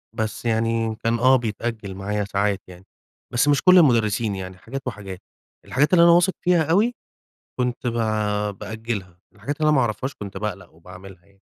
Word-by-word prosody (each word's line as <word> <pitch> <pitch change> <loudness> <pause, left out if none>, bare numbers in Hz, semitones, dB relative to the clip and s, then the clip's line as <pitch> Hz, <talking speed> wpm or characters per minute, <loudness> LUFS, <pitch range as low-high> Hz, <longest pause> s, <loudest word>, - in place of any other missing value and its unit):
بس 110 +1 -3
يعني 115 0 0
كان 115 +1 +1
آه 130 +2 +5
بيتأجل 110 -4 -3
معايا 105 +2 -2
ساعات 100 0 -1
يعني. 90 +1 -14 0.5
بس 120 +4 +2
مش 145 -1 +3
كلّ 185 0 +6
المُدرّسين 115 - +3
يعني، 95 -1 -7
حاجات 135 +7 -7
وحاجات. 100 -5 -7 0.4
الحاجات 150 +8 +1
اللي 170 -1 +7
أنا 170 - +7
واثق 175 +2 +4
فيها 175 -2 +3
أوي 205 +10 +2 0.7
كنت 125 0 -2
ب 120 - 0 0.7
بأجلها، 110 -5 -6
والحاجات 125 +9 -5
اللي 155 - +3
أنا 150 - +4
ما - - +4
أعرفهاش 120 +5 -3
كنت 100 -3 -9
باقلَق 100 -1 -5
وباعملها 90 +2 -14
يعني. 100 0 -28
110 Hz, 170 wpm, -23 LUFS, 100-130 Hz, 0.7 s, اللي